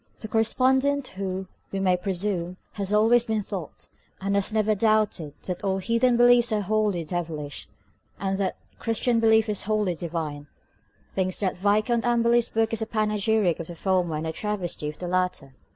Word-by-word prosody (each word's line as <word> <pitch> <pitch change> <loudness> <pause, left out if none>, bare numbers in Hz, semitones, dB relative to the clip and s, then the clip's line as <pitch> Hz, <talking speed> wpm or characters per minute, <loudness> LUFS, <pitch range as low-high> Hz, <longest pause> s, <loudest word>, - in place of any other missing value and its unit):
The 220 - -6
correspondent 260 +5 +2
who, 190 0 -4 0.3
we 195 - -2
may 185 -1 +3
presume, 180 -1 -2
has 200 -1 -3
always 225 +3 +4
been 220 -3 -1
taught, 190 -5 -5 0.3
and 195 +1 -2
has 200 +1 +1
never 215 0 +2
doubted, 210 -8 +1
that 180 +1 -4
all 190 -1 +1
heathen 230 +5 +2
beliefs 240 0 +5
are 215 -1 +1
wholly 205 -3 0
devilish, 155 -4 -4 0.5
and 195 -1 -1
that 195 - 0 0.2
the - - -34
Christian 230 +1 +1
belief 220 0 +4
is 210 -3 -1
wholly 210 -3 +1
divine, 160 -4 -5 0.6
thinks 185 -1 -1
that 190 -2 0
Viscount 210 +5 +1
Amberley's 235 0 +3
book 225 0 0
is 225 - 0
a 220 - -2
panegyric 215 -4 +1
of 165 - -6
the 175 - -8
former 180 -2 0
and 155 +1 -3
a 160 - -2
travesty 180 -6 -3
of 150 - -9
the 180 - -5
latter. 180 -7 -1
205 Hz, 175 wpm, -25 LUFS, 180-220 Hz, 0.6 s, beliefs